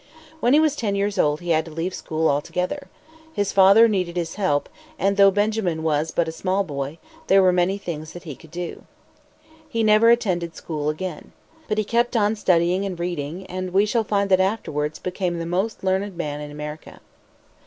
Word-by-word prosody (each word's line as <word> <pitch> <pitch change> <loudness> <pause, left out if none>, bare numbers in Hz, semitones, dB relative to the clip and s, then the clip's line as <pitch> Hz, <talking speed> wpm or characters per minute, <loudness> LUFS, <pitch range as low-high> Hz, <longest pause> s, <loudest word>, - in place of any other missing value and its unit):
When 245 -1 +3
he 300 - +6
was 310 -2 +2
ten 210 -7 -1
years 200 0 -1
old 150 +1 +2
he 175 -1 -2
had 160 -1 +3
to - - -9
leave 165 +4 -3
school 160 -2 -1
altogether. 180 - -2 0.5
His 205 -1 -1
father 200 +4 +7
needed 180 -5 -1
his 165 -2 -2
help; 185 -8 0 0.3
and 200 0 +1
though 200 0 +7
Benjamin 205 -5 0
was 155 0 +1
but 165 +1 0
a - - -2
small 185 +4 -1
boy, 140 -2 -5 0.3
there 195 - +6
were 185 -1 +4
many 180 +2 +1
things 155 -5 -6
that 175 - -10
he 150 -5 -7
could 160 - -17
do. 175 +1 -6 0.8
He 230 -1 0
never 215 +1 +5
attended 180 -8 +1
school 150 -2 -3
again. 155 +1 -5 0.3
But 215 - -1
he 215 - +2
kept 235 +3 +1
on 210 0 +2
studying 180 -2 +2
and 190 -3 -4
reading; 170 +1 -4
and 185 0 -5
we 200 +2 +4
shall 225 +2 +1
find 200 -2 0
that 185 - +5
he 190 - +4
afterwards 155 -7 -2
became 180 -1 -3
the 165 - -4
most 190 +6 -2
learned 190 0 -1
man 150 -3 -3
in 150 - -7
America. 150 +1 -8
185 Hz, 200 wpm, -23 LUFS, 160-205 Hz, 0.8 s, father